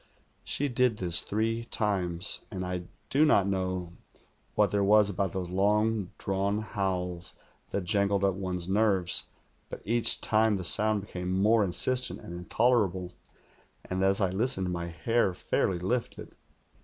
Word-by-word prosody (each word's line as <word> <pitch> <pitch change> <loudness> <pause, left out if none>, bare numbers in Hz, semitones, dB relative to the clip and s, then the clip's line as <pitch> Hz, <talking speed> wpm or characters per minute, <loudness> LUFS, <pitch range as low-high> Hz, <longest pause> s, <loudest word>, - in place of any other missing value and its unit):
She 145 - -2
did 125 -3 +1
this 85 -3 +3
three 115 +2 -2
times, 95 -5 -1
and 95 -4 -5
I 90 -1 -4 0.3
do 145 +3 +4
not 105 -11 +4
know 95 -2 -2 0.6
what 105 -1 +2
there 100 -1 +1
was 105 0 +4
about 95 -1 -2
those 90 -2 -4
long 105 +1 +1
drawn 100 +2 -1
howls 90 -4 -3 0.3
that 100 - -3
jangled 100 +2 +1
up 95 - +2
one's 90 -2 -3
nerves, 95 -3 +2 0.4
but - - -9
each 115 +2 +3
time 110 -1 +2
the 95 - -5
sound 105 +3 +3
became 90 -2 -5
more 110 +2 +4
insistent 125 +7 +2
and 85 - -10
intolerable, 95 -1 0 0.7
and 95 0 -3
as 95 +1 +3
I 95 -3 +1
listened, 95 -3 0
my 85 -1 -4
hair 95 +3 0
fairly 90 - -1
lifted. 115 +8 -3
100 Hz, 145 wpm, -28 LUFS, 90-110 Hz, 0.7 s, do